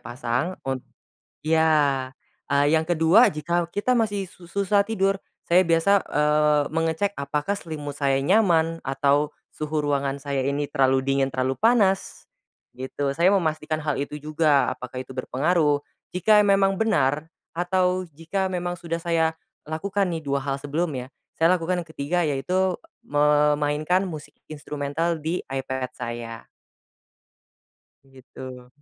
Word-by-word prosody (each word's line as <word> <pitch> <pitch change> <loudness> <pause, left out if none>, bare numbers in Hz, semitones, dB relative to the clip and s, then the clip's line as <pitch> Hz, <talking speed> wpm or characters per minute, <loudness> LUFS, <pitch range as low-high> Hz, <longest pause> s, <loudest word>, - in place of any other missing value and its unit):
pasang 120 +8 -3
un 130 -1 -2 0.6
iya, 150 -5 +2 0.3
eee, 145 +1 +2
yang 160 - -3
ke-2 175 +6 +5
jika 170 +3 -1
kita 220 +8 0
masih 205 -4 -1
su 175 - -16
susah 200 +2 +1
tidur, 195 -3 +1 0.2
saya 180 +1 +3
biasa, 170 +4 +3
eee, 150 0 +3
mengecek 165 +5 0
apakah 150 +8 -2
selimut 150 -4 -7
saya 135 -1 +1
nyaman 165 -2 +3
atau 140 +2 +1 0.2
suhu 155 0 -3
ruangan 140 -1 -1
saya 140 -2 -1
ini 140 +1 -1
terlalu 135 -2 +2
dingin, 135 0 0
terlalu 130 0 -1
panas, 210 -4 +1 0.4
gitu 135 +2 -3
saya 175 +7 +3
memastikan 155 -3 -1
hal 150 -2 -1
itu 145 +1 -4
juga 155 -2 +2
apakah 125 0 -6
itu 130 - -20
berpengaruh, 145 +3 +1 0.3
jika 210 +4 +4
e 205 - +4
memang 195 -1 +3
benar, 155 -9 +1 0.3
atau 185 0 +1
jika 180 +5 -2
memang 175 -1 -3
sudah 165 0 -4
saya 165 -1 +1 0.3
lakukan 195 +5 -1
nih 165 -2 -3
2 140 -1 -1
hal 135 0 -4
sebelumnya, 145 -3 -3 0.2
saya 165 +1 +3
lakukan 175 +1 -1
ke-3 160 +2 -2
yaitu 180 +5 0 0.3
memainkan 150 +3 +2
musik 150 -4 -8 0.2
instrumental 150 +2 -2
di 165 +3 -1
iPad 130 -1 -3
saya. 115 -1 -6 1.6
Begitu. 130 -1 -11
155 Hz, 130 wpm, -24 LUFS, 140-175 Hz, 1.6 s, ke-2